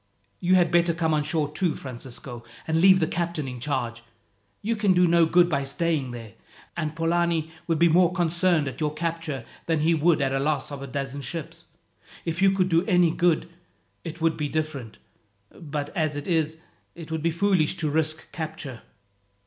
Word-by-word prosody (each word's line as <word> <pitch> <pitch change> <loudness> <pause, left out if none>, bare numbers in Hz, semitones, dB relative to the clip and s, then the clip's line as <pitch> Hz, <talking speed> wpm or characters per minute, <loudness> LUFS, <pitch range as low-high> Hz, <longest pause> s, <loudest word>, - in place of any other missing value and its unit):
"You 185 +1 +3
had 175 -2 +4
better 170 -1 +3
come 160 -1 +1
on 150 - +2
shore 150 -1 -1
too, 170 0 0
Francisco, 125 -1 -8 0.2
and 160 0 +2
leave 190 0 +7
the 160 - +2
captain 170 -3 -2
in 125 -1 -6
charge. 120 -4 -2 0.6
You 230 +3 0
can 210 -3 +3
do 180 0 +4
no 170 -1 +4
good 175 +1 +5
by 140 -5 0
staying 140 0 -1
there; 115 -4 -8 0.4
and 155 0 -3
Polani 165 -1 +1 0.2
would 165 -2 +1
be 170 +2 +5
more 175 +1 +4
concerned 175 -3 +1
at 130 +3 -6
your 150 0 -1
capture 165 -4 -3 0.2
than 160 -2 +1
he 165 +2 +3
would 160 +1 +3
at 135 -2 +1
the 135 - 0
loss 150 +1 -1
of 140 -1 -6
a 140 - -6
dozen 135 +1 -4
ships. 165 +2 -6 0.6
If 170 +2 -2
you 195 - +6
could 190 -1 +2
do 165 0 +3
any 180 -4 +4
good, 170 -1 +2 0.6
it 165 0 -7
would 165 -1 +2
be 150 -2 -2
different; 150 -8 -3 0.5
but 145 -3 -6
as 155 -3 0
it 145 0 -5
is, 160 -3 +1 0.4
it 165 -2 -10
would 160 -1 -2
be 165 - +2
foolish 170 -2 +2
to 160 - -1
risk 155 +1 -1
capture." 155 -6 -6
160 Hz, 190 wpm, -25 LUFS, 145-170 Hz, 0.6 s, leave